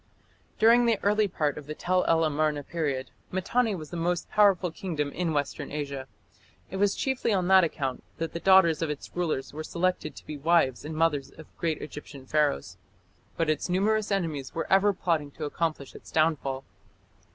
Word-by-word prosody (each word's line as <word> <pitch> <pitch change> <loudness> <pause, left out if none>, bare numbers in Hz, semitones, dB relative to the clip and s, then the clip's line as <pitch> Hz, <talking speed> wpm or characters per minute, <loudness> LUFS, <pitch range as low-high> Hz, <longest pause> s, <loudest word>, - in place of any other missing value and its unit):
During 235 +2 +5
the 230 -2 +3
early 210 +1 +3
part 150 -5 -1
of 145 - -13
the 150 - -5
Tell 180 +2 +1
el 165 0 +3
Amarna 150 -1 0
period, 140 -5 -3 0.2
Mitanni 215 +4 +1
was 155 -4 -8
the 175 - -4
most 175 +1 -1
powerful 195 -4 +4
kingdom 155 -5 -3
in 170 +1 -1
Western 145 -2 -2
Asia. 140 -3 -4 0.6
It 190 - -4
was 200 0 +2
chiefly 265 -3 0
on 185 -3 +1
that 190 -1 +7
account 135 -5 -2
that 165 0 -3
the 170 - -3
daughters 190 -4 +5
of 165 - 0
its 150 -1 -6
rulers 160 -7 -2
were 155 +1 -5
selected 175 -2 -1
to - - -12
be 150 - -6
the - - -16
wives 165 -7 +3
and 155 +1 -6
mothers 155 -4 +1
of 160 - -15
great 160 -3 -2
Egyptian 145 -2 -9
Pharaohs. 130 - 0 0.6
But 165 - +1
its 155 +2 0
numerous 210 +4 +1
enemies 160 -9 -2
were 165 - -1
ever 200 +2 +5
plotting 165 -6 -1
to 155 - -5
accomplish 155 -2 -2
its - - -13
downfall. 150 -4 +1
165 Hz, 185 wpm, -27 LUFS, 150-185 Hz, 0.6 s, that